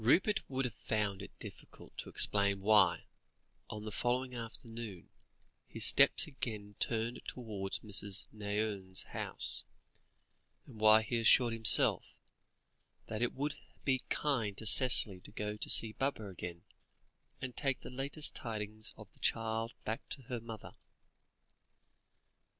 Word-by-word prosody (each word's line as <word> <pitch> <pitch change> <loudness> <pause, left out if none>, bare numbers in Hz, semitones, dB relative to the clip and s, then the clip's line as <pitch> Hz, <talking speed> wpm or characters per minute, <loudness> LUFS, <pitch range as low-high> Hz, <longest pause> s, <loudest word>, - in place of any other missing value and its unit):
Rupert 190 - +1
would 135 -1 -3
have 125 - -5
found 105 -3 -4
it 100 - -13
difficult - - -14
to - - -7
explain 100 -1 +2
why, 105 -1 +2 0.6
on 105 0 -8
the 110 - -7
following 125 +4 -3
afternoon, 115 -4 -10 0.6
his - - +2
steps - - +5
again 110 -8 -8
turned 115 +1 -3
towards 105 -6 -6
Mrs. 100 -2 -2
Nairne's 100 -3 -2
house, - - +1 1.0
and 110 - -15
why 110 0 +4
he 120 +1 -3
assured 115 +1 +3
himself, 115 -1 +8 1.1
that 110 0 -6
it 120 - -2
would 145 +2 -4 0.3
be 130 -2 0
kind 115 -9 -3
to 110 - -7
Cicely 115 -4 +6
to - - -17
go 105 0 -6
to 105 - -4
see 110 - +5
Baba 135 -5 -4
again, 85 -1 -10 0.8
and 130 -1 -8
take 135 -2 -2
the - - -11
latest 140 +4 -2
tidings 110 -1 -7
of 105 -2 -13
the - - -18
child 115 0 -2
back 110 +2 -6
to 135 - -4
her 120 0 -7
mother. 115 -3 -11
110 Hz, 135 wpm, -32 LUFS, 105-125 Hz, 1.1 s, himself